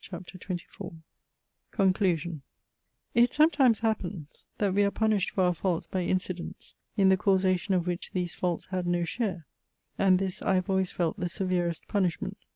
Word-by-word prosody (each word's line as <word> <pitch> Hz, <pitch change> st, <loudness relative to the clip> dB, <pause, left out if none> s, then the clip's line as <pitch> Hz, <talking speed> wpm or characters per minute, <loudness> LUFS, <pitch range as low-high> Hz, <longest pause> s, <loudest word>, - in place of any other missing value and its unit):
CHAPTER 185 Hz, 0 st, -9 dB
XXIV 175 Hz, -2 st, -6 dB, 0.7 s
CONCLUSION 180 Hz, -5 st, +1 dB, 0.7 s
It 240 Hz, 0 st, +5 dB
sometimes 290 Hz, -7 st, +4 dB
happens 190 Hz, -8 st, -3 dB
that 200 Hz, -3 st, +1 dB
we 205 Hz, +1 st, +4 dB
are 200 Hz, -, +3 dB
punished 215 Hz, -2 st, +1 dB
for 190 Hz, -, 0 dB
our 180 Hz, 0 st, +3 dB
faults 175 Hz, -1 st, -1 dB
by 185 Hz, -, -2 dB
incidents, 185 Hz, 0 st, -3 dB, 0.2 s
in 195 Hz, -2 st, +5 dB
the 190 Hz, -, +5 dB
causation 190 Hz, 0 st, +2 dB
of 175 Hz, -2 st, +1 dB
which 175 Hz, -1 st, -3 dB
these 180 Hz, -2 st, -1 dB
faults 175 Hz, -2 st, -2 dB
had 185 Hz, -2 st, -1 dB
no 175 Hz, 0 st, +1 dB
share: 185 Hz, -5 st, -3 dB, 0.5 s
and 190 Hz, -1 st, +5 dB
this 190 Hz, -1 st, -3 dB
I 190 Hz, -, +2 dB
have 185 Hz, +1 st, 0 dB
always 190 Hz, -1 st, +2 dB
felt 175 Hz, +4 st, -1 dB
the 175 Hz, -1 st, -1 dB
severest 175 Hz, -3 st, -1 dB
punishment. 185 Hz, -5 st, -1 dB
185 Hz, 160 wpm, -28 LUFS, 175-200 Hz, 0.7 s, It